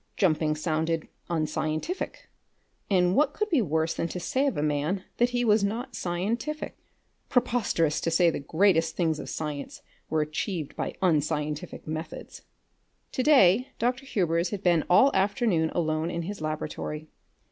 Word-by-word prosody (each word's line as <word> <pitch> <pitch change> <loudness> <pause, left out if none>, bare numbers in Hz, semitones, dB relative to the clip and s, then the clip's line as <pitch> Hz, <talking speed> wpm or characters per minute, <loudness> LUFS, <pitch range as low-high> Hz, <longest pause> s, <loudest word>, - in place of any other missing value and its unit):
Jumping 155 -5 +2
sounded 160 +1 -1 0.2
unscientific, 155 - -2 0.6
and 180 -2 +3
what 295 0 +3
could 425 0 -2
be 300 -7 +4
worse 160 -3 0
than 165 - -2
to 180 - -5
say 260 +11 0
of 270 - -1
a 145 - 0
man 155 +6 0
that 240 +1 +3
he 245 0 0
was 210 -2 +4
not 230 +4 -2
scientific? 210 - -2 0.5
Preposterous 235 - +1
to - - 0
say 170 +1 +4
the - - -3
greatest 165 +2 +2
things 160 -3 0
of - - -6
science 150 -2 -5 0.3
were 160 -1 +1
achieved 155 +1 -3
by - - -3
unscientific 155 -1 0
methods! 155 +1 -6 0.7
To - - -1
day 250 -5 +5
Dr. 245 +3 -1
Hubers 170 -6 +1
had 200 0 -5
been 170 -3 +3
all 265 +10 +6
afternoon 190 -4 +2
alone 155 -1 -1
in 170 -1 -3
his 200 0 -6
laboratory. 155 0 -4
175 Hz, 150 wpm, -27 LUFS, 155-215 Hz, 0.7 s, all